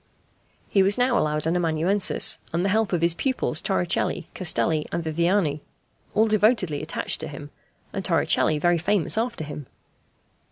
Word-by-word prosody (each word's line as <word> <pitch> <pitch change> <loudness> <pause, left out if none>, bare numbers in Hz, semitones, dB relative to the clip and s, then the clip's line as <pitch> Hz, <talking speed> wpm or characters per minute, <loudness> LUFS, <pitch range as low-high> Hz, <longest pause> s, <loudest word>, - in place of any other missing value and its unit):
He 195 - +4
was 195 +1 +2
now 250 0 +2
allowed 150 -4 0
an 165 +2 0
amanuensis, 175 +3 +1
and 170 +3 -1
the - - +1
help 220 +1 +1
of 175 -3 0
his 170 0 +4
pupils 260 +8 -1
Torricelli, - - -1
Castelli, 160 -3 +1
and 170 - -2
Viviani, 160 -1 0 0.5
all 220 +1 +4
devotedly 210 - +2
attached - - 0
to - - -4
him, - - -9 0.4
and - - -4
Torricelli 155 - +2
very 175 +2 +2
famous 195 +1 +1
after 230 -6 -2
him. 145 -2 -8
175 Hz, 155 wpm, -24 LUFS, 160-205 Hz, 0.5 s, He